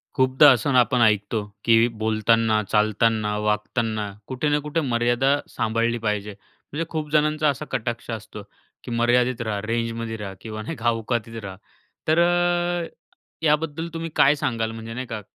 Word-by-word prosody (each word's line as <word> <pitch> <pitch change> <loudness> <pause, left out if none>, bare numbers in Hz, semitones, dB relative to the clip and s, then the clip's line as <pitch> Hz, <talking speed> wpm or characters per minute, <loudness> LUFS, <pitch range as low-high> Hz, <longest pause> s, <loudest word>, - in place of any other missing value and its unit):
खूपदा 130 +2 +6
असंन 130 +2 +1
आपण 125 0 +4
ऐकतो 105 0 +2 0.2
की 115 0 +5
बोलतान, 110 +1 +2 0.2
चालताना, 110 0 +2
वागताना 105 +1 -1 0.2
कुठे 130 +3 -1
ना 145 0 +2
कुठे 150 +3 -2
मर्यादा 125 +2 +1
सांभाळली 115 +2 0
पाहिजे. 105 0 -2 0.4
म्हणजे 160 +3 -2
खूप 155 -2 -4
जणांचा 150 0 +2
असा 140 - -3
कटाक्ष 120 0 -3
असतो, 110 -1 -7 0.4
की 125 - -7
मर्यादित 120 +1 +2
राहा. 110 -3 -2
रेंजमध्ये 115 0 -3
रहा 100 -2 -6
किंवा 110 -1 -6
नाही 110 - -5
का 120 +1 +1
औकातीत 115 0 -3
रहा. 95 -2 -7 0.5
तर 160 +2 +3
अ, 175 0 +1 0.6
याबद्दल 155 +1 +1
तुम्ही 165 0 -4
काय 140 +2 +5
सांगाल? 115 -6 -2
म्हणजे 115 0 -8
नाही 130 +2 -4
का, 110 -2 -5
115 Hz, 150 wpm, -23 LUFS, 110-145 Hz, 0.6 s, खूपदा